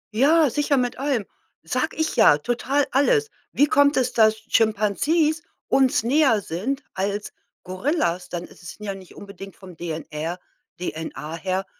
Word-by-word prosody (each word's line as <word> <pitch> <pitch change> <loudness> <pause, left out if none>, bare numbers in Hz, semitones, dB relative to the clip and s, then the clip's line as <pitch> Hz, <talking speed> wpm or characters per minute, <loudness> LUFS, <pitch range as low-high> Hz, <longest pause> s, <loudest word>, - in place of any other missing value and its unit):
Ja, 300 +6 +5
sicher, 290 +2 +1
mit 250 0 -1
allem, 270 -7 0 0.4
sage - - -2
ich 315 0 -1
ja, 145 - +6
total, 255 - 0
alles. 435 - +2 0.2
Wie 290 - +4
kommt 285 0 +3
es, 255 -1 +1
dass 220 -1 +4
Chimpanzees 230 - +2 0.3
uns 260 -4 +3
näher 265 -3 +3
sind 235 - -3
als 200 +2 -3 0.3
Gorillas? 185 - -1
Dann 175 -1 -4
es - - -15
sind 195 +4 -10
ja 200 - -2
nicht 190 -2 -13
unbedingt 200 -1 -10
vom 185 -3 -13
DNR, 160 0 -5 0.4
DNA 160 -2 -5
her 190 +2 -2
220 Hz, 150 wpm, -23 LUFS, 185-285 Hz, 0.4 s, ja